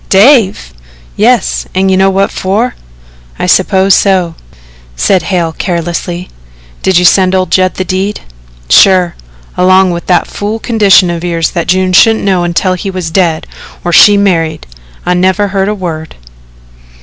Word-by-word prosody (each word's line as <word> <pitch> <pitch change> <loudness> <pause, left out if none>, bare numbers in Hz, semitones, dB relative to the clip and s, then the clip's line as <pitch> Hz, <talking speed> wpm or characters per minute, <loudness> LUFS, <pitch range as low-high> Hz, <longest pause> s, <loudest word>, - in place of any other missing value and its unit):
"Dave!" 195 - +3 0.4
"Yes, - - 0
an' 190 +1 +1
you 190 - +2
know 190 +1 +3
what 195 +1 0
for." 210 +7 -2 0.6
"I - - -3
suppose 190 +1 +2
so," 185 -4 +1 0.6
said 180 - +1
Hale 175 -2 -2
carelessly. 175 +1 -4 0.5
"Did 190 -2 +1
you 180 - +2
send 185 +1 +3
old 185 0 -1
Judd 185 -1 +1
the 185 - -3
deed?" 190 +3 -3 0.5
"Sure 180 - +4 0.4
along 185 0 +3
with 170 0 -6
that 175 -2 +2
fool 210 +2 -5
condition 205 -6 +2
of 170 0 -5
yours 170 -2 -1
that 170 - -3
June 185 0 0
shouldn't 225 +3 +3
know 185 -3 +1
until 175 +2 -1
he 185 +2 -5
was 185 -3 -5
dead 165 -3 0 0.4
or 175 - -2
she 205 +3 +6
married. 165 - -1 0.4
I've 180 0 0
never 190 +3 0
heard 195 0 -1
a 210 - -2
word." 160 -5 -6
185 Hz, 155 wpm, -9 LUFS, 175-195 Hz, 0.6 s, she